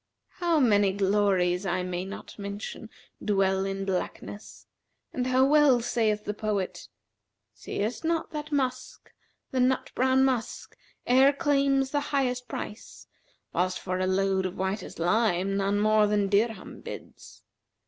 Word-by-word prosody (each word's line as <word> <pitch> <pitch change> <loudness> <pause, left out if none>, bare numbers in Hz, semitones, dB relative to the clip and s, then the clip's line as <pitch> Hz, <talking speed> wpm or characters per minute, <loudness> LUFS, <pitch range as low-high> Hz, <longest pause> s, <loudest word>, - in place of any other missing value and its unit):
How 340 -3 +2
many 205 -6 +4
glories 195 -2 +2
I 185 -1 -1
may 180 0 -3
not 200 +2 -9
mention 200 +2 -6 0.3
dwell 195 -2 +1
in 195 0 -3
blackness, 195 +2 -5 0.5
and 250 -1 -1
how 255 +1 +4
well 290 -3 +5
saith 215 -3 0
the 210 - -2
poet, 210 -3 -3 0.7
'Seest 220 +9 -4
not 330 0 -1
that 300 0 -6
musk, 260 -3 -3 0.4
the 260 - -1
nut 255 +1 +1
brown 260 +1 +3
musk, 250 -4 -2 0.3
e'er 265 +3 +6
claims 275 -2 +1
the 290 - +1
highest 250 -3 0
price 215 -1 -7 0.2
* - - -41
Whilst 185 +1 0
for 185 0 -3
a 185 - 0
load 190 0 +1
of 185 - -9
whitest 190 +3 -3
lime 195 +1 +1
none 200 +1 +1
more 215 0 +4
than 205 -1 +1
dirham 210 0 -1
bids? - - -10
210 Hz, 140 wpm, -27 LUFS, 195-260 Hz, 0.7 s, e'er